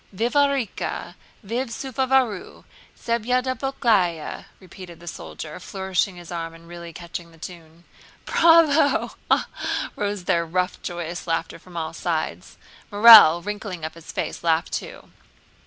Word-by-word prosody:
"Vivarika! 255 +2 -1 0.3
Vif 235 +6 -2
seruvaru! 260 -3 -1 0.4
Sedyablyaka!" 235 - 0
repeated 180 -2 -12
the 175 - -14
soldier, 155 0 -8
flourishing 190 0 -2
his 175 -1 -11
arm 165 -1 -5
and 165 0 -16
really 170 0 -9
catching 170 0 -8
the 165 - -19
tune. 165 0 -11 0.4
"Bravo! 320 -4 +4
Ha, - - -17
ha, - - +3
ha!" - - -3
rose 205 -2 -3
their 175 -2 +1
rough, 180 +2 -2
joyous 175 -1 -5
laughter 165 0 -2
from 180 -2 -12
all 160 0 -3
sides. 155 - -3 0.3
Morel, 205 -6 +9
wrinkling 205 -5 -5
up 160 - -6
his 165 -1 -11
face, - - -4
laughed 165 0 +1
too. - - -6
180 Hz, 130 wpm, -23 LUFS, 170-230 Hz, 0.4 s, Morel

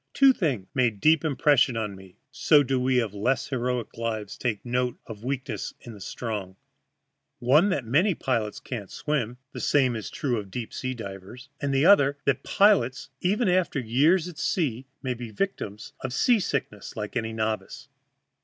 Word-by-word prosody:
Two 270 -1 +7
things 140 - -1
made 120 -6 +1
deep 155 +3 +4
impression 140 -5 +3
on 105 -3 -3
me 95 -1 -15
(so 145 -1 +4
do 135 -1 0
we 125 0 +2
of 110 -4 -2
less 115 +5 0
heroic 125 -2 -2
lives 110 -3 -3
take 110 -4 -3
note 125 0 -1
of 110 -2 -9
weakness 130 -4 -4
in 120 - -10
the 105 - -12
strong) 100 -3 -5 0.8
one, 150 +11 +4
that 140 -10 -1
many 165 - +3
pilots 115 -7 -1
cannot 110 -7 -6
swim 125 -6 -2
(the - - -7
same 130 -4 +2
is 110 - -5
true 125 -5 -1
of 100 -2 -8
deep 115 +3 -6
sea 130 0 -3
divers), 105 +4 -9
the 140 +1 +2
other, 145 -8 +6
that 140 - +2
pilots, 195 - +3
even 205 +5 +1
after 180 -4 +2
years 145 +9 +3
at 165 -3 -9
sea, 135 -9 -1 0.2
may 130 -2 -1
be 120 -1 -7
victims 105 - -4
of 130 - -3
seasickness 145 - 0
like 105 +1 -5
any 115 -2 -1
novice. 110 -1 -3
125 Hz, 170 wpm, -26 LUFS, 110-145 Hz, 0.8 s, Two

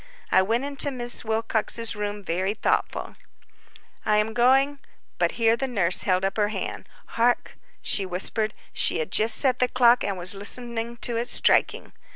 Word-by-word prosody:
I - - +5
went 225 +6 -1
into 285 0 -3
Miss 245 -3 -4
Wilcox's 225 0 0
room 205 0 -5
very 190 +4 -2
thoughtful. - - -2 0.9
"I 210 0 +1
am 210 +1 0
going—" 270 +4 +2 0.4
But - - +1
here 230 -1 +2
the 270 +3 -3
nurse 190 -8 +2
held 185 -1 0
up 195 - -3
her 210 -1 +2
hand. 215 - -6 0.2
"Hark," 240 +1 -1 0.3
she 195 -2 +2
whispered; 210 +4 -1 0.2
she - - +2
had 160 +3 -4
just 220 +1 +5
set 255 -3 +2
the 250 - +2
clock, 245 -1 +3
and 195 -2 -3
was 180 +1 +2
listening 235 +3 -2
to 235 -1 -1
its 235 +1 -2
striking. - - +2
225 Hz, 170 wpm, -24 LUFS, 205-240 Hz, 0.9 s, I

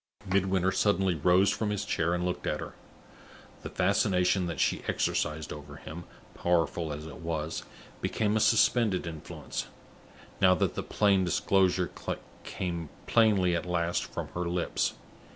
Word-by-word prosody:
Midwinter 95 -1 +2
suddenly 95 -2 +2
rose 90 +5 +4
from 110 0 -1
his 105 -1 -2
chair 85 -3 0
and 90 0 -1
looked 90 - -3
at - - 0
her. - - -7 0.9
The - - -6
fascination 90 -1 +2
that 85 - -4
she - - +1
exercised 75 0 -1
over 75 -1 -10
him, 80 +3 -9 0.3
powerful 85 -2 0
as 75 +1 -6
it 80 - -9
was, 80 -2 -3 0.4
became 105 -1 0
a - - +3
suspended 110 -3 +3
influence, 80 -3 -6 0.7
now 90 -1 +6
that - - 0
the - - -3
plain 100 -3 +2
disclosure 90 0 +2 0.5
came 85 -4 -4 0.2
plainly 100 -6 +4
at 85 - -3
last 85 -1 0
from - - -6
her 90 -1 -3
lips. 90 0 -1
90 Hz, 145 wpm, -29 LUFS, 85-95 Hz, 0.9 s, now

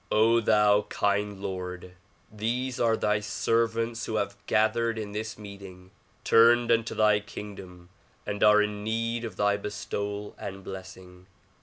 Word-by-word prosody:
thou 105 -2 +4
kind 100 0 0
Lord! 90 -1 -5 0.4
These 125 +4 -2
are 115 -1 +2
thy 105 0 +1
servants 115 +2 -1
who 110 - -3
have 105 -1 -1
gathered 115 +1 +1
in 105 -2 -5
this 110 +1 -5
meeting, 100 -3 -11 0.3
turned 120 +1 +5
unto 115 -1 +1
thy 105 -1 +4
kingdom 95 -4 -10 0.4
and 105 0 -2
are 105 0 +6
in 105 0 -4
need 115 +2 -2
of 110 -5 -6
thy 105 0 +2
bestowal 100 0 -5
and 95 -1 -7
blessing. 95 -1 -10
105 Hz, 135 wpm, -27 LUFS, 100-115 Hz, 0.4 s, are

